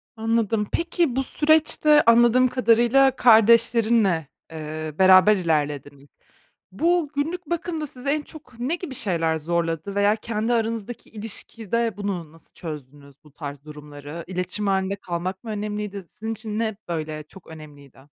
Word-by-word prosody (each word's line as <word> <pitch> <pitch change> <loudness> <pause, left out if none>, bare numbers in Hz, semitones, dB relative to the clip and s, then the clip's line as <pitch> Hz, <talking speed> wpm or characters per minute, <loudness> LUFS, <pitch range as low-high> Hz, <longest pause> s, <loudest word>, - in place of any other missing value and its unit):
Anladım. 225 -1 0
Peki 335 -5 0
bu 270 - +1
süreçte 305 0 +4
anladığım 240 +2 +5
kadarıyla 250 +2 +3
kardeşlerinle, 225 - +4 0.3
ııı, 155 0 -6
beraber 190 +3 +7
ilerlediniz. 145 -4 -2 0.7
Bu 335 - +1
günlük 325 +4 -3
bakımda 330 -2 -3
sizi 265 0 -9
en 300 +1 +1
çok 285 -6 -15
ne 275 +8 -1
gibi 335 -7 -7
şeyler 165 -8 0
zorladı 165 +3 -2
veya 205 +1 +3
kendi 225 +1 -2
aranızdaki 230 0 -3
ilişkide 225 0 -4
bunu 185 -6 -4
nasıl 165 - -21
çözdünüz 145 -3 -10
bu 150 - -19
tarz 145 -2 -8
durumları? 150 +1 -9
İletişim 180 +3 -3
hâlinde 195 0 0
kalmak 185 +2 -5
mı 225 - -6
önemliydi? 210 -2 -4
Sizin 220 +3 -6
için 215 -1 -5
ne, 220 -3 -1
böyle, 155 -2 -4
çok 165 +5 -17
önemliydi? 145 -4 -13
210 Hz, 135 wpm, -23 LUFS, 165-235 Hz, 0.7 s, beraber